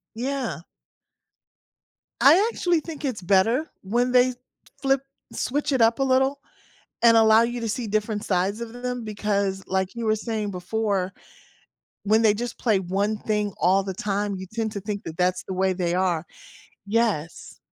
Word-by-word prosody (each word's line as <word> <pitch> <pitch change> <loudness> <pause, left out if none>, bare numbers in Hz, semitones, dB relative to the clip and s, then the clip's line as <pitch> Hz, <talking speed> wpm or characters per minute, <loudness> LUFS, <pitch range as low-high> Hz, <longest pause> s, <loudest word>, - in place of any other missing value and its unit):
Yeah. 255 - -3 1.6
I 350 +10 +6
actually 350 -6 +1
think 310 -1 -8
it's 250 -8 -3
better 220 - +2
when 240 +6 0
they 250 0 +5
t 245 - -14 0.4
flip 270 -1 +2 0.3
switch 290 +2 -1
it 260 -3 +2
up 230 +3 +4
a - - +3
little 265 +1 +2 0.6
and 230 -1 +7
allow 220 0 +6
you 240 +1 -2
to 230 - -3
see 230 +2 -3
different 215 0 -1
sides 195 +4 0
of 230 -1 -6
them, 245 0 -4
because, 200 -2 -1
like, 190 +1 -1
you 235 -1 -4
were 215 - +3
saying 215 -1 -3
before, 195 0 -2 0.9
when 215 +2 +3
they 215 -2 +5
just 240 +3 -5
play 215 -5 +2
one 200 +4 -1
thing 210 -1 -1
all 190 +2 +3
the 190 0 -4
time, 200 +1 -2
you 190 0 -7
tend 220 -1 -2
to 200 -2 -5
think 205 0 -4
that 165 0 -8
that's 180 0 +1
the 190 - -3
way 190 +1 +1
they 175 -2 -1
are. 180 -3 0 0.6
Yes, 205 -7 -1
215 Hz, 170 wpm, -24 LUFS, 195-245 Hz, 1.6 s, and